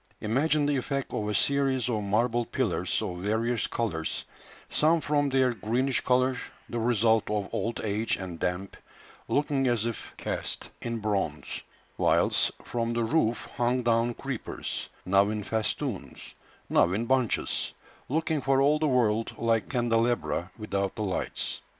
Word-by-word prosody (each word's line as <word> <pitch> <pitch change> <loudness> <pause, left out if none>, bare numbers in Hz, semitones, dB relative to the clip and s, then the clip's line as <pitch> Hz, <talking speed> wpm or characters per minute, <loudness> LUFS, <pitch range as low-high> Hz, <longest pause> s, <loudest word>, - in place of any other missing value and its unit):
Imagine 145 +7 +2
the 145 -1 +2
effect 140 +1 -2
of 105 -1 -1
a 105 - -1
series 135 -3 +2
of 110 -4 0
marble 115 +4 +1
pillars - - -1
of 90 -1 -4
various 110 +4 0
colours, 85 -9 -2 0.4
some 160 +2 +3
from 145 -1 +1
their 130 -2 +3
greenish 120 +2 0
colour, 130 0 +2 0.3
the 120 - -3
result 115 -1 +3
of 105 -2 -1
old 115 - -1
age 110 +1 0
and 90 -4 -6
damp, 90 +2 -2 0.5
looking 140 -2 +1
as 120 -3 +2
if 115 -1 -5
cast - - -2
in 115 0 -2
bronze, 100 -9 -2 0.4
whilst - - +3
from 115 -1 -2
the 115 0 +1
roof 115 -1 +1
hung 125 +1 +1
down 115 0 +2
creepers, 135 -4 -4 0.2
now 100 +2 +4
in 105 -1 -2
festoons, 110 +1 -3 0.3
now 85 - +4
in 110 +4 0
bunches, 130 -2 +1 0.4
looking 160 +1 0
for 135 0 +3
all 145 +3 +4
the 155 - +2
world 115 -4 +1
like 115 -1 +1
candelabra 120 -6 +1
without 100 -3 -2
the 110 - -2
lights. 95 -3 -2
115 Hz, 145 wpm, -28 LUFS, 105-130 Hz, 0.5 s, now